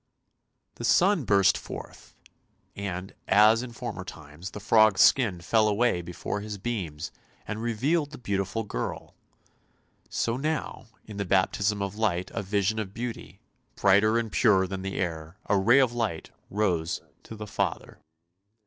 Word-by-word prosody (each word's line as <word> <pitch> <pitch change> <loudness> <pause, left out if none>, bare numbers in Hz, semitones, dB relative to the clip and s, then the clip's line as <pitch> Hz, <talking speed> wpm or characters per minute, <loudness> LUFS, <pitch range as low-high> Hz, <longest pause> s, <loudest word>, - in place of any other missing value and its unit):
The - - -7
sun 175 - +3
burst 100 -2 +4
forth, - - -10 0.6
and, 95 -2 -5
as 110 +3 +6
in 125 -1 -7
former 115 -5 -6
times, 80 +1 -9
the 105 - -8
frog's 110 -1 +4
skin 105 -10 +4
fell 110 +5 +3
away 105 -3 +2
before 90 +4 -5
his 105 0 -6
beams 90 -8 -4 0.4
and 110 0 -4
revealed 140 +7 0
the 150 - -10
beautiful 100 0 -2
girl; - - -5 1.0
so 115 +1 -1
now, 150 -3 -3 0.2
in 105 -2 -9
the 100 - -1
baptism 100 +2 +1
of 100 +1 -5
light, 95 -5 0
a - - -2
vision 100 +2 0
of 100 -2 -5
beauty, 115 0 -6 0.3
brighter 100 +3 +4
and 115 -2 -2
purer 100 -5 +4
than 95 0 -5
the 95 0 -4
air 80 -1 -4
— - - -37
a 100 - +2
ray 100 +7 +5
of 130 -3 +4
light 110 -9 -3
— - - -41
rose 90 -6 0 0.2
to 110 - -10
the 105 0 -7
Father. 105 - -3
105 Hz, 160 wpm, -27 LUFS, 95-115 Hz, 1.0 s, as